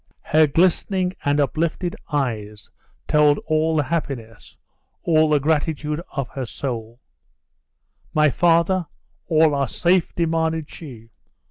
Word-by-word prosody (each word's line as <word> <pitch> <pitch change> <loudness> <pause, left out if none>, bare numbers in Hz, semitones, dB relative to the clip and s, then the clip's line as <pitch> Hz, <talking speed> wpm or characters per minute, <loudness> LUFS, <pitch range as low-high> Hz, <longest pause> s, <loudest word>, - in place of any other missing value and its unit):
Her 155 0 +4
glistening 180 +3 +1
and 145 +1 +1
uplifted 165 +5 -1 0.2
eyes 110 -7 -3 0.4
told 150 -1 +4
all 155 +1 +1
the 150 - +2
happiness, 130 -8 -5 0.5
all 155 -2 +3
the 150 -1 +3
gratitude 150 +1 -1
of 140 -4 -3
her 130 -3 -5
soul. 115 -2 -5 1.1
"My 150 -1 +3
father? 170 +3 +2 0.4
All 160 -2 +4
are 140 -1 0
safe?" 175 +6 +1
demanded 160 -2 -1
she. 115 -8 -11
150 Hz, 115 wpm, -22 LUFS, 140-165 Hz, 1.1 s, Her